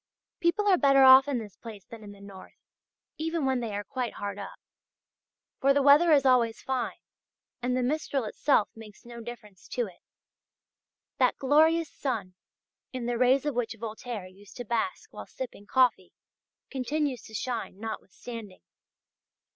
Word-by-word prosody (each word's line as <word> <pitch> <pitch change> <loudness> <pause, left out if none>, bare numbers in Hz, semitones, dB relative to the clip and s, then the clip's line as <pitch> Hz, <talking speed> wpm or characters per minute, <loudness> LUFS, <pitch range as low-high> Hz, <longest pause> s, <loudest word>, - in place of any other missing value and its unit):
People 340 +5 +1
are 370 -4 +5
better 275 -1 +5
off 265 +1 +9
in 280 -3 0
this 210 -5 -7
place 215 -5 -11
than 225 -2 -11
in 205 - -10
the 200 - -14
north, 200 -1 -13 0.6
even 325 -1 -1
when 265 -1 +1
they 225 -4 -4
are 205 - -3
quite 250 +2 -4
hard 200 0 -5
up. 200 - -8 1.0
For 275 +1 +3
the 285 - +3
weather 295 +4 +6
is 280 -3 +5
always 240 -3 +3
fine, 255 -3 -3 0.6
and 250 +1 0
the 255 - 0
Mistral 280 0 -1
itself 220 +1 +1
makes 225 +1 -13
no 235 0 -9
difference 215 -5 -11
to 245 - -2
it. 185 -4 -14 1.2
That - - +3
glorious 315 +4 +3
sun, 220 -9 -3 0.6
in 255 -2 -5
the 240 -1 -2
rays 255 +2 +3
of 295 - 0
which 235 -2 -2
Voltaire 220 -2 -6
used 190 +2 -15
to 245 - -6
bask 360 - -3
while - - -9
sipping 235 -6 -8
coffee, 245 -8 +2 0.6
continues 275 0 -2
to 220 - -11
shine 230 -4 -4
notwithstanding. 220 -1 -8
245 Hz, 160 wpm, -28 LUFS, 215-275 Hz, 1.2 s, off